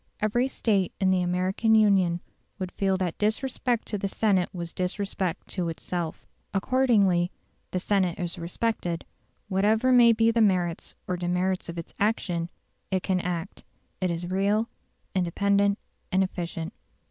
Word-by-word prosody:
Every 240 +5 +2
State 205 -8 0
in 190 -1 +3
the 185 -1 +3
American 185 +5 +2
Union 190 -5 +4 0.4
would 185 -2 -4
feel 195 -1 +1
that 180 -3 -2
disrespect 235 +2 0
to 210 - -2
the 195 - -1
Senate 195 -3 +2
was 170 -2 -6
disrespect 185 -1 -2
to 175 -3 -2
itself. 165 0 -4 0.3
Accordingly, 200 -6 +3 0.4
the 185 - -1
Senate 185 -2 +1
is 175 0 -4
respected; 175 -1 -2 0.4
whatever 215 +6 +3
may 240 -2 +7
be 225 0 +4
the 230 0 +2
merits 180 -5 +1
or 180 - -1
demerits 180 +1 -1
of 170 - -6
its 165 - -7
action, 180 -5 0 0.4
it 190 -2 0
can 185 -2 +1
act; 180 0 -4 0.4
it 185 - +1
is 170 0 -2
real, 205 +4 +2 0.5
independent, 200 +3 +2 0.3
and 190 +1 +4
efficient. 170 -3 -4
190 Hz, 145 wpm, -27 LUFS, 175-210 Hz, 0.5 s, may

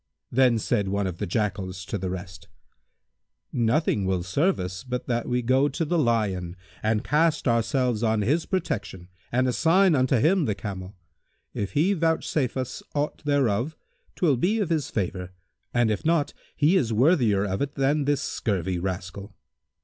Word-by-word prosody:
Then 125 -2 +4
said 100 -2 0
one 100 +1 0
of 90 -2 -4
the 105 - -2
Jackals 95 -3 -2
to - - -4
the 95 0 -3
rest, 90 +1 -7 1.1
"Nothing 115 -2 +1
will 95 -2 0
serve 145 - +1
us 90 +2 -5
but 125 -1 -4
that 120 -1 -1
we 125 0 0
go 130 +4 +3
to 150 +4 -2
the 170 +2 +1
Lion 100 - 0 0.3
and 110 0 0
cast 160 0 +1
ourselves 120 0 +1
on 110 -2 +1
his 150 +10 +1
protection 100 - -3 0.2
and 130 +2 +2
assign 170 +8 +4
unto 130 -1 +2
him 160 - +3
the 105 -4 -1
camel. 95 -1 -7 0.6
If 100 - -4
he 160 +7 +3
vouchsafe 160 -6 0
us 130 -1 -4
aught 145 +1 -2
thereof, 140 -1 +1 0.4
'twill 150 -8 +2
be 200 - +1
of 190 -5 -1
his 155 -5 0
favour, 90 -2 -3 0.4
and 120 -2 +2
if 105 - -2
not, 160 -2 +1 0.2
he 150 +6 +3
is 125 -11 +2
worthier 115 - +3
of 95 -1 -2
it 140 0 -2
than 140 +1 +1
this 145 0 +1
scurvy 95 -4 -2
rascal." 95 +2 -5
120 Hz, 165 wpm, -25 LUFS, 100-145 Hz, 1.1 s, Then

